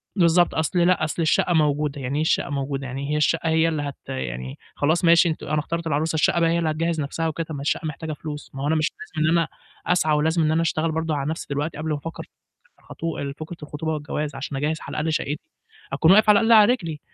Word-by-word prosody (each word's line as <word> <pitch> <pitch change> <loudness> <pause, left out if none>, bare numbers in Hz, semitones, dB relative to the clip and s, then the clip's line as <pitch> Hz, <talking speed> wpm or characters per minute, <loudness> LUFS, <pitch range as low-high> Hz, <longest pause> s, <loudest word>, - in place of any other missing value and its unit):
بالض 190 - +3
بالضبط، 170 +1 +4
"أصل 160 +3 0
لأ، 175 -1 +3
أصل 155 +2 -2
الشَقّة 165 +2 +2
موجودة." 150 -2 +1
"يعني 130 +2 -3
إيه - - +1
الشَقّة 160 - +1
موجودة؟ 140 -1 -3
يعني 135 +3 -4
هي 150 - +1
الشَقّة 165 +2 +1
هي 160 +1 +3
اللي 155 -2 -1
هت 140 -2 -5
يعني 65 0 -5 0.2
خلاص 160 +5 +1
ماشي 170 +1 +6
أنتم 160 - -4
أنا 155 0 +1
اخترت 165 +2 -3
العروسة، 155 +1 0
الشَقّة 160 +2 +2
بقى 165 -1 +3
هي 170 +1 +1
اللي 165 - 0
هتجهّز 165 +1 -1
نَفْسها 160 +3 -2
وكده؟ 160 +1 -3
طب 160 - -6
ما 140 - -5
الشَقّة 145 +3 -1
محتاجة 155 +1 -5
فلوس، 150 0 -7
ما 135 - -4
هو 145 - 0
أنا 160 - +2
مش 155 -1 +1
لازم 155 -4 -3
إن 170 - +4
أنا 165 -2 +1 0.4
أسعى 160 -3 +2
ولازم 160 +3 +1
إن 155 - +2
أنا 160 +1 +2
أشتغل 165 0 0
برضه 160 0 -1
على 140 0 -2
نَفْسي 160 - -4
دلوقتي، 145 +2 -2
قبل 155 +1 -4
ما 150 - +1
أفكّر 165 +3 -7
في - - -30
الخطو 155 -4 -5
فكرة 160 +2 -7
الخطوبة 150 +2 -4
والجواز، 150 -1 -3
عشان 135 0 -5
أجهّز 150 +3 -1
على - - -8
الأقل 155 +1 0
شَقّتي، 150 - -3 0.4
أكون 165 - +4
واقف 215 +2 +6
على 205 -1 +7
الأقل 225 +1 +2
على 210 +3 +5
رجلي؟" 165 -10 -5
155 Hz, 250 wpm, -23 LUFS, 145-165 Hz, 0.4 s, على